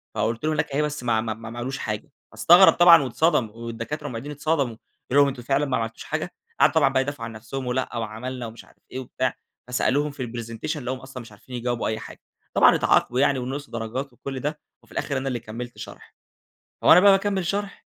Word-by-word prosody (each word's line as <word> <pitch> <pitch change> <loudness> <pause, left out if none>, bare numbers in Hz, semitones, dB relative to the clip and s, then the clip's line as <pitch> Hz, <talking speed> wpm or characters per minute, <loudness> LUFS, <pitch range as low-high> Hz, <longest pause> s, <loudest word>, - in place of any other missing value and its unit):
فقلت 115 +2 -1
له: 155 - +1
"هناك 150 -1 -1
أهي 145 +2 +1
بس 150 -3 -3
ما 115 -2 +2
ه - - 0
ما 110 -1 -2
ما 115 +1 -9
ما 120 - -9
عملوش 135 +3 -3
حاجة." 105 -1 -5 0.2
فاستغرب 175 - +7
طبعًا 170 -4 +7
واتصدم 130 -2 +1
والدكاترة 115 +6 -6
والمُعيدين 135 +2 -5
اتصدموا. 145 -4 -1 0.4
قالوا 145 +2 +6
لهم: 140 - +2
"أنتم 130 -3 -5
فعلًا 140 +3 +1
ما 130 -3 0
عملتوش 115 0 -4
حاجة؟" - - -4 0.3
قعدوا - - +5
طبعًا 145 -4 +5
بَقى 135 -1 +2
يدافعوا 135 -3 -4
عن 115 - -6
نفسهم 120 +4 -6
ولأ 125 -1 -2
وعملنا 115 +3 -5
ومش 115 +1 -11
عارف - - -24
إيه 130 - -4
وبتاع، 130 0 -2 0.3
فسألوهم 140 +4 +1
في 140 -2 -6
الpresentation 115 +6 -5
لقوهم 130 -1 -4
أصلًا 130 -1 -9
مش 115 -2 -13
عارفين 115 +5 -11
يجاوبوا 120 0 -2
أي 110 - -2
حاجة. - - -11 0.3
طبعًا - - +6
اتعاقبوا 125 - +2
يعني 140 -1 +3
ونقصوا 135 +3 -5
درجات 120 +4 -4
وكل 135 +2 -6
ده 150 +3 -3 0.2
وفي - - -24
الآخر 140 - -2
أنا 135 +1 -3
اللي 125 -2 -2
كمّلت 120 +2 -8
شرح. - - -11 0.7
وأنا 175 - +8
بقى 200 +2 +7
باكمّل 195 -2 +1
شرح، 200 +2 -3
130 Hz, 215 wpm, -24 LUFS, 115-145 Hz, 0.7 s, وأنا